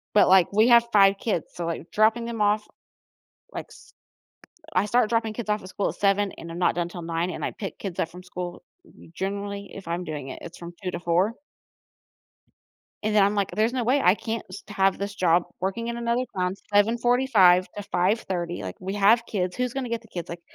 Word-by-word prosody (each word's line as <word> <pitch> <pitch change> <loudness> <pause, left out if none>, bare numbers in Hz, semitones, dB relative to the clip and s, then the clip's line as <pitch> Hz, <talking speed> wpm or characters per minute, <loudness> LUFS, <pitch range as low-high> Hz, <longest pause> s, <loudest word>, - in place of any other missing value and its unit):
But, 210 - +6
like, 185 -2 +5
we 215 +4 +4
have 235 -1 +7
5 195 -2 +6
kids, 200 -8 -2
so, 175 - -4
like, 170 0 -4
dropping 220 +2 +3
them 230 -2 -4
off, 210 +1 +2 0.8
like, - - -6
s - - -17 0.8
I 205 - +2
start 235 +1 +2
dropping 225 -1 0
kids 215 -1 -6
off 210 0 +1
at 185 - -10
school 200 - -1
at - - -6
7:00, 200 0 +2
and 165 - -8
I'm 165 - -6
not 180 - +2
done 175 0 -1
'til 175 0 -8
9:00, 165 +1 -1
and - - -4
I - - -2
pick 195 - -7
kids 190 -4 -5
up 165 - 0
from 180 +1 -12
school, 180 -1 -7 0.2
we 165 - -18
generally 200 +2 -4
if 195 -3 -10
I'm 170 +2 -2
doing 150 -5 -6
it, - - -7
it's 170 - -9
from 170 0 -9
2:00 180 - -2
to - - -4
4:00 180 +7 +1 1.7
and 215 0 0
then 205 - +6
I'm, 200 +1 +2
like, 200 -2 0
"There's 215 +6 +1
no 255 -2 0
way. 260 +5 +2
I 180 - +6
can't 225 +1 -4
s - - -9
have 195 -2 +2
this 200 +1 -4
job 175 -2 +3 0.2
working 195 +5 -2
in 235 0 -3
another 235 +1 0
town, 180 0 0 0.2
7:45 225 -4 +4
to 205 - -4
5:30, 180 - -1
like, 95 -1 -5
we 190 +1 -4
have 215 +4 +4
kids. 185 -5 -2
Who's 250 -1 -1
gonna 265 -3 -3
get 230 -1 -2
the 225 - -18
kids? 175 -5 -6
Like, 170 0 -7
200 Hz, 220 wpm, -25 LUFS, 180-225 Hz, 1.7 s, have